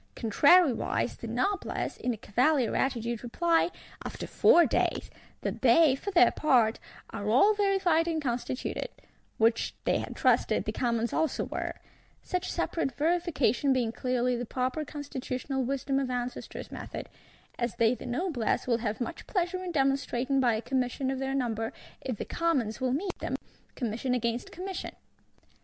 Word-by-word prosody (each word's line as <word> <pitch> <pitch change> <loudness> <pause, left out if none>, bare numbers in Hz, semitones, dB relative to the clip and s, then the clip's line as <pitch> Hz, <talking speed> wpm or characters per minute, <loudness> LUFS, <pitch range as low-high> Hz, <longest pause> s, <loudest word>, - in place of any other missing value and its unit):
Contrariwise 280 - +3
the - - -7
Noblesse, 395 0 -1
in 245 -2 -2
cavalier 250 +4 +1
attitude, 235 -3 -1
reply, 335 +8 +2 0.3
after - - -6
four 345 - +5
days, - - 0 0.3
that - - -3
they, 270 +3 +6
for 395 - -5
their 365 -2 +6
part, 245 -7 +3 0.3
are 205 +1 -3
all 275 - +5
verified 385 -5 +2
and 325 -2 0
constituted; 255 -2 -3 0.5
which, 225 +1 +2
they - - +2
had - - -6
trusted, - - +2
the - - -1
Commons 235 -2 -1
also 320 -1 0
were; - - -4 0.5
such 365 -1 -2
separate 300 -6 -1
verification 295 -5 +2
being 245 -3 0
clearly 250 +1 0
the 240 - -3
proper 255 +5 -2
constitutional 270 -2 -4
wisdom 275 +1 -1
of 270 -2 -2
ancestors 245 0 -5
method;—as 240 -1 -7
they 230 0 +3
the 250 - -7
Noblesse 250 - -1
will 240 -2 +1
have 215 -2 -2
much 240 - -5
pleasure 365 -1 -1
in 360 - -4
demonstrating 275 -2 +1
by 240 -4 +3
a 220 - -4
Commission 260 +1 -1
of 265 - -3
their 270 0 -2
number, 225 -3 -1 0.3
if 255 -5 -3
the - - -4
Commons 270 -9 0
will 255 -1 +1
meet 360 +8 -2
them, - - -2 0.4
Commission 245 +1 -1
against 235 0 -2
Commission! 375 +1 -6
260 Hz, 150 wpm, -29 LUFS, 240-320 Hz, 0.5 s, they